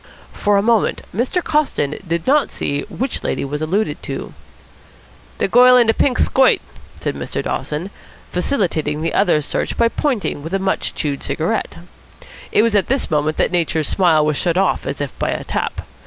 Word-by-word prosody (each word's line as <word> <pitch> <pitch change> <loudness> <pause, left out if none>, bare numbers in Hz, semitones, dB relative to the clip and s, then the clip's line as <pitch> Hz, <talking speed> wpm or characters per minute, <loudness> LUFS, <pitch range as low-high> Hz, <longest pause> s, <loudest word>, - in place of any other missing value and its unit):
For 205 0 +2
a 200 - +2
moment 230 -1 +2
Mr. 255 - 0
Coston 295 - 0
did 165 0 -1
not 290 +2 +3
see 145 0 -2
which 260 +1 -3
lady - - -2
was 150 +2 -4
alluded 160 0 -1
to. 135 - -6 1.0
"De - - +1
goil 250 +4 +7
in 240 - +5
de 225 - +3
pink 255 +1 +1
skoit," 265 -1 +4 0.4
said - - -2
Mr. - - -4
Dawson, 160 +6 -3 0.4
facilitating 165 - 0
the 165 - -1
other's 165 -7 +2
search - - -2
by 230 0 +3
pointing 240 - -1
with 165 +6 -4
a - - +3
much 190 0 -1
chewed 145 -2 -2
cigarette. 160 +10 -2 0.7
It 210 - +4
was 230 -2 +2
at 200 - +3
this 270 -7 -1
moment 155 +1 0
that - - +1
Nature's 165 -3 0
smile 165 -5 +3
was 150 -2 0
shut 175 -1 0
off 195 0 +1
as 140 +1 -4
if 145 - -3
by - - 0
a - - -2
tap. - - -3
185 Hz, 185 wpm, -19 LUFS, 150-230 Hz, 1.0 s, goil